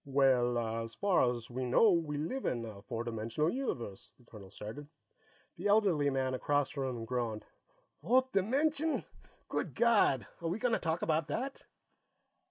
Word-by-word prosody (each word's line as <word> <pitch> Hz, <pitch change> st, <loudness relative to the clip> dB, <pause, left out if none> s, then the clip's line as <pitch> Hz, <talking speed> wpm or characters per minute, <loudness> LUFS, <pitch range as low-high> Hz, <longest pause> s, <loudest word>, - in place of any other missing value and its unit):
"Well, 130 Hz, -4 st, +3 dB
as 115 Hz, 0 st, -3 dB
far 185 Hz, -11 st, +3 dB
as 120 Hz, -1 st, -7 dB
we 130 Hz, +2 st, -3 dB
know, 130 Hz, -, +5 dB
we 160 Hz, -4 st, 0 dB
live 210 Hz, -, -2 dB
in 120 Hz, -2 st, -1 dB
a 105 Hz, -3 st, -9 dB
four 115 Hz, +3 st, -4 dB
dimensional 115 Hz, +7 st, -1 dB
universe," 120 Hz, -, -4 dB
the 125 Hz, -, -23 dB
colonel 105 Hz, -4 st, -12 dB
started. 115 Hz, +10 st, -8 dB, 0.7 s
The 185 Hz, +5 st, -2 dB
elderly 195 Hz, -9 st, +3 dB
man 130 Hz, -1 st, 0 dB
across 145 Hz, +1 st, 0 dB
from 130 Hz, -3 st, -3 dB
him 115 Hz, -, -5 dB
groaned. 115 Hz, -3 st, -2 dB, 0.6 s
"Fourth 260 Hz, +1 st, +3 dB
dimension! 285 Hz, +10 st, +1 dB, 0.4 s
Good -, -, -3 dB
God, 215 Hz, -, +4 dB, 0.2 s
are 170 Hz, -, -2 dB
we 175 Hz, -, -1 dB
going 235 Hz, +1 st, 0 dB
to -, -, +2 dB
talk 165 Hz, 0 st, -1 dB
about 160 Hz, -1 st, +1 dB
that?" 260 Hz, -, -4 dB
140 Hz, 165 wpm, -33 LUFS, 120-195 Hz, 0.7 s, know